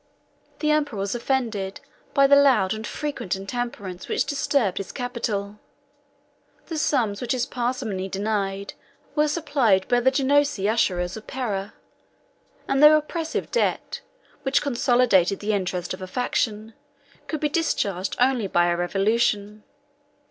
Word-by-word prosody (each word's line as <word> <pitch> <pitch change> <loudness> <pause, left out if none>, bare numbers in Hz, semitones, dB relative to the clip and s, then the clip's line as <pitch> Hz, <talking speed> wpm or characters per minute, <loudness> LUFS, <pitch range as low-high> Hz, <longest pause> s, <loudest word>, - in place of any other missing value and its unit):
The 305 -1 +2
emperor 295 -7 0
was 195 0 -2
offended 230 -6 -2 0.4
by 275 -1 +6
the 280 +1 +6
loud 255 -9 +4
and 220 +1 -5
frequent 285 -11 -3
intemperance 195 -2 -5
which - - 0
disturbed 275 -8 0
his 195 - -6
capital; 210 -5 -3 1.1
the 320 -2 -4
sums 230 -9 0
which 245 - -1
his 245 -2 0
parsimony 240 -7 -3
denied 200 0 -2 0.4
were 300 0 +2
supplied 275 - +1
by 245 -1 +3
the 250 +2 +4
Genoese 285 +1 +2
usurers 190 -3 0
of 215 - -11
Pera; 210 -6 -3 0.9
and 270 0 +1
the 300 +1 +9
oppressive 320 +1 -3
debt, 480 0 -1 0.4
which 270 0 +1
consolidated 240 -8 +3
the 210 +1 -1
interest 180 -3 -2
of 185 - -8
a 185 - -5
faction, 220 0 -2 0.5
could 305 +2 -3
be 300 - +1
discharged 200 - -1
only 250 -4 +2
by 175 -1 +2
a - - +1
revolution. 205 +3 0
230 Hz, 135 wpm, -24 LUFS, 195-275 Hz, 1.1 s, the